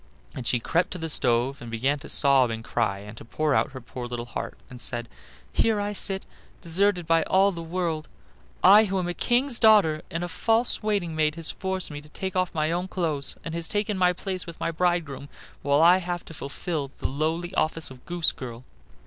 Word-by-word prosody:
Then 125 - -7
she 120 - +2
crept 170 +9 0
to - - -5
the 165 -2 -4
stove, 125 +2 +1
and 120 - -8
began 130 +6 0
to 145 - -10
sob 135 -3 +4
and 115 0 -5
cry 115 -4 -1
and 105 +2 -10
to - - -9
pour 150 +6 -1
out 135 - +1
her 130 - -6
poor 120 +1 -7
little 120 -1 -5
heart, - - -6
and 125 -1 -8
said: 120 0 0 0.5
"Here 220 -2 +2
I 205 0 -2
sit, 195 -1 0 0.3
deserted 180 +1 +1
by 165 0 +3
all 195 +1 +4
the 170 -3 -6
world, 165 -2 -3 0.6
I 205 +4 +8
who 195 -1 -2
am 180 -2 -1
a 175 - -2
king's 245 +6 +1
daughter, 205 -9 +5
and 165 +2 -3
a - - -2
false 225 +7 +1
waiting 200 -7 -1
maid 155 -1 +1
has 165 -1 +3
forced 190 -3 -3
me 145 0 -6
to 150 - -17
take 190 +5 -5
off 185 -1 +1
my 155 0 +1
own 175 +2 -1
clothes, 155 -7 0
and 165 - -4
has 165 -1 -2
taken 210 +2 -1
my 180 -1 +3
place 185 0 -5
with 170 - -9
my - - -1
bridegroom, 165 -5 -1 0.3
while 145 +2 +3
I 175 +2 +7
have 175 -1 -4
to - - -11
fulfill 145 0 -4
the - - -2
lowly 160 +6 -2
office 160 -4 -1
of 125 -1 -13
goose 175 -2 +2
girl. 120 -2 -8
165 Hz, 215 wpm, -26 LUFS, 140-185 Hz, 0.6 s, I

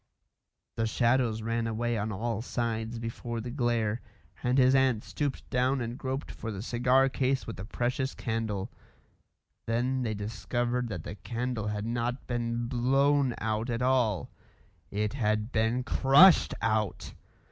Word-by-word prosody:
The 115 0 +1
shadows 115 -1 +1
ran 115 0 -1
away 120 +1 -1
on 110 0 -2
all 110 +2 -2
sides 115 -1 -2
before 115 0 -4
the 120 +2 -5
glare, 120 -3 0 0.4
and 125 +1 +1
his 130 0 +5
aunt 130 -5 +3
stooped 145 -3 -3
down 130 +2 +2
and 120 -1 -3
groped 135 +2 -4
for 115 - -6
the 100 -1 -5
cigar 125 +3 +3
case 135 0 0
with 115 - -6
the 95 - -6
precious 125 +5 -2
candle. 110 -4 -3 1.0
Then 125 +3 0
they 110 -3 -1
discovered 120 +4 -2
that 90 -7 -5
the - - -6
candle 120 -2 -3
had 105 0 -2
not 120 +2 -2
been 120 -1 -2
blown 135 +2 +2
out 110 +2 -2
at 120 +1 -1
all; 125 -7 +1 0.6
it 105 +2 -1
had 110 -3 0
been 115 +3 +1
crushed 140 +9 +6
out. 110 -3 -1
120 Hz, 145 wpm, -29 LUFS, 110-125 Hz, 1.0 s, crushed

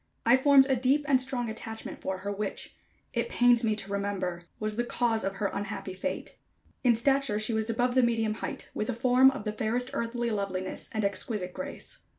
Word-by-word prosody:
I 235 +2 +7
formed 270 0 +6
a 265 - +3
deep 265 +4 +2
and 265 -2 +4
strong 255 -2 -2
attachment 225 0 -6
for 190 0 -2
her, 205 - -1
which, 200 0 -4 0.4
it - - -1
pains 245 - +4
me 215 -1 +2
to 200 -2 -5
remember, 195 -3 -2 0.2
was 215 0 -2
the 240 - 0
cause 235 -2 0
of 195 +1 -2
her 200 0 -1
unhappy 200 -2 -4
fate. 270 +10 -5 0.4
In 240 -3 +5
stature 270 -1 +2
she 215 +2 +1
was 220 0 0
above 245 +2 +1
the 260 - +5
medium 225 -2 +1
height, 220 - -6
with 215 - -3
a 250 - -1
form 255 +2 +5
of 270 -4 -5
the 210 0 -2
fairest 240 +4 -1
earthly 235 0 -1
loveliness 190 -3 -3
and 215 -2 -1
exquisite 200 -2 -2
grace. 280 - -5
225 Hz, 200 wpm, -29 LUFS, 210-250 Hz, 0.4 s, I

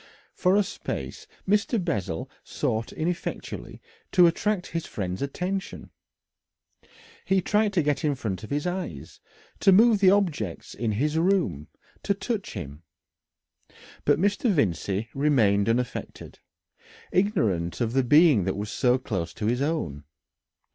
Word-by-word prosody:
For 185 +1 +2
a 205 - +4
space - - -6 0.2
Mr. 210 +4 +2
Bessel 100 - -2 0.2
sought 110 +1 -2
ineffectually 170 +2 -4 0.3
to 180 -2 +6
attract 185 +3 +1
his 165 -1 -3
friend's 95 -2 -4
attention. 180 +7 -4 1.3
He 190 0 +2
tried 210 +3 +1
to 175 -4 +2
get 145 +2 0
in 150 -2 +1
front 100 -8 -4
of 110 - -8
his 145 +2 -2
eyes, 175 - -5 0.4
to 195 - +5
move 220 +2 +6
the 195 -2 +6
objects 165 - 0
in 115 -3 -2
his 150 +8 0
room, 165 - +1 0.3
to 200 - 0
touch 200 +1 -4
him. 75 -6 -7 1.2
But - - +3
Mr. 205 - +1
Vincey 105 - 0
remained 115 -8 +3
unaffected, 120 +1 -3 0.7
ignorant 100 - +1
of 120 -2 -1
the 135 0 +3
being 145 - +5
that 95 0 -1
was 105 +1 -4
so 125 0 +2
close 95 -10 -4
to 105 - -4
his 120 +4 +1
own. 140 - -2
145 Hz, 135 wpm, -26 LUFS, -, 1.3 s, to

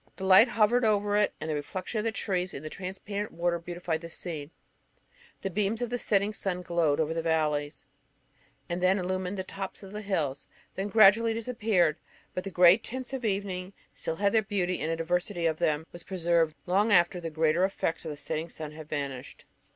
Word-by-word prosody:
The 190 - -5
light 190 +5 +8
hovered 235 +1 +3
over 205 -1 +2
it, 210 0 +3
and - - -5
the 155 - -1
reflection 185 +9 -3
of 210 - -2
the 225 - +1
trees 185 -4 -2
in 140 - -7
the 155 - -6
transparent 200 +2 -5
water 170 0 0
beautified 170 -1 -3
the 170 - -8
scene. 160 -4 -6 0.9
The 195 - -2
beams 210 +4 0
of 245 -1 -3
the 245 - -1
setting 205 -1 +1
sun 185 -3 -3
glowed 165 -4 +1
first - - +2
over 160 +1 0
the 165 - -1
valleys, 150 -3 0 0.8
and 175 +1 -3
then 185 +2 +4
illumined 185 +1 -2
the 190 - -2
tops 195 +1 -7
of 195 - -10
the 210 +1 -5
hills; 155 -10 -2 0.3
then 195 +1 -3
gradually 220 +2 +6
disappeared: 215 -9 +1 0.4
but 185 - -3
the 195 - -4
grey 180 0 +7
tints 255 +3 -6
of 260 -2 -3
evening 195 -3 -2 0.2
still 160 - -3
had 200 +3 +2
their 220 - +4
beauty, 185 -3 -1
and 160 - -1
a - - 0
diversity 175 +2 -1
of 160 -1 +1
them 155 0 +1
was 175 - -9
preserved 170 -4 +1
long 200 +5 +2
after 175 -1 +4
the 165 - -4
greater 160 +2 +2
effects 190 -4 -1
of 160 - -5
the 150 - -6
setting 155 +3 -4
sun 155 -2 -7
had 155 0 -11
vanished. 140 -4 -5
180 Hz, 205 wpm, -29 LUFS, 165-205 Hz, 0.9 s, light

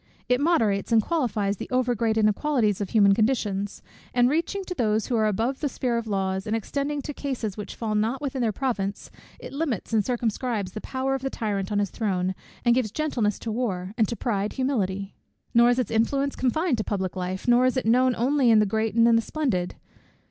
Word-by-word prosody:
It 250 +2 +2
moderates 225 -12 +2
and 225 - +6
qualifies 215 - 0
the - - -7
over 255 -1 +1
great 225 -1 0
inequalities 215 -1 +2
of 200 - -2
human 200 -3 +5
conditions; 205 -3 0 0.3
and 245 +1 +4
reaching 340 +6 -1
to 365 - -5
those 220 -7 +1
who 245 - -1
are 220 -1 +3
above 230 +6 -1
the 295 - -1
sphere 250 -2 -1
of 235 -1 -2
laws, 190 -1 -1
and 215 - 0
extending 280 +6 -2
to 295 - -5
cases 250 -8 -3
which 210 - -7
fall 220 -2 -3
not 220 +5 0
within 270 -3 -3
their 225 -2 +2
province, 205 -5 -3 0.3
it - - -9
limits 275 - -2
and 215 -2 +3
circumscribes 230 -4 -2
the 215 - -6
power 265 +1 -2
of 270 - -2
the 270 - -2
tyrant 205 -5 -3
on 205 - 0
his 205 -1 0
throne, 190 -4 -1 0.3
and 240 - +5
gives 245 -3 +1
gentleness 235 -6 -1
to 225 - -5
war, 200 -5 -2
and 225 -3 +2
to 235 - -3
pride, 210 -4 -1
humility. 200 -8 -1 0.4
"Nor 235 +1 +6
is 245 - +2
its 255 - -1
influence 275 +5 +1
confined 265 +1 0
to - - 0
public 190 -4 -2
life, 185 +2 -4
nor 245 +1 +5
is 255 - 0
it 255 - -1
known 250 +2 +4
only 260 +1 +2
in 225 - +6
the 210 - +5
great 220 +1 -1
and 230 0 +5
the 230 - +4
splendid. 225 - -2
230 Hz, 215 wpm, -25 LUFS, 205-260 Hz, 0.4 s, and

